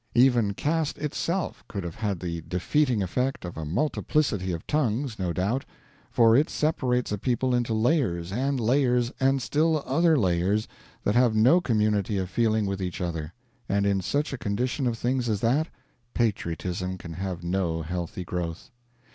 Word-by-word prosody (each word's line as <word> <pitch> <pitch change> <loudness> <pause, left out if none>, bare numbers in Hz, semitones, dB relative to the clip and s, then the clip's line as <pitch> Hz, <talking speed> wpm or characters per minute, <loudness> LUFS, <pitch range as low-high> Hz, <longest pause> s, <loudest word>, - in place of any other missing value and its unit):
Even 120 -5 +4
caste 155 +3 -1
itself 165 +4 -2
could 100 -3 -5
have 85 -1 -5
had 105 -3 -2
the 85 -2 -4
defeating 115 +5 +1
effect 125 +5 -1
of 85 - -6
a 80 - -5
multiplicity 105 - 0
of 85 -2 -5
tongues, 130 -5 0
no 90 -2 -1
doubt; 100 +10 0 0.5
for 115 -1 +5
it 145 +5 +3
separates 125 -6 0
a 105 - -2
people 125 +2 0
into 120 -2 +1
layers, 110 - +1
and 135 +5 0
layers, 125 0 +2
and 135 -1 +2
still 155 0 +1
other 165 -1 +3
layers, 95 0 +1 0.4
that 105 - +1
have 120 -2 +4
no 130 +12 +5
community 105 - +1
of 95 -1 -3
feeling 110 0 +2
with 100 0 -2
each 90 -1 -3
other; 80 -3 -3 0.4
and 100 0 +2
in 100 -1 +2
such 145 - -1
a 135 - -4
condition 125 +7 -1
of 115 -1 -1
things 125 0 0
as 105 -2 0
that, 135 +9 +2 0.5
patriotism 90 -4 -1
can 85 -2 -8
have 90 0 -4
no 85 -2 -1
healthy 90 +2 -4
growth. 85 +3 -5
110 Hz, 165 wpm, -26 LUFS, 90-130 Hz, 0.5 s, for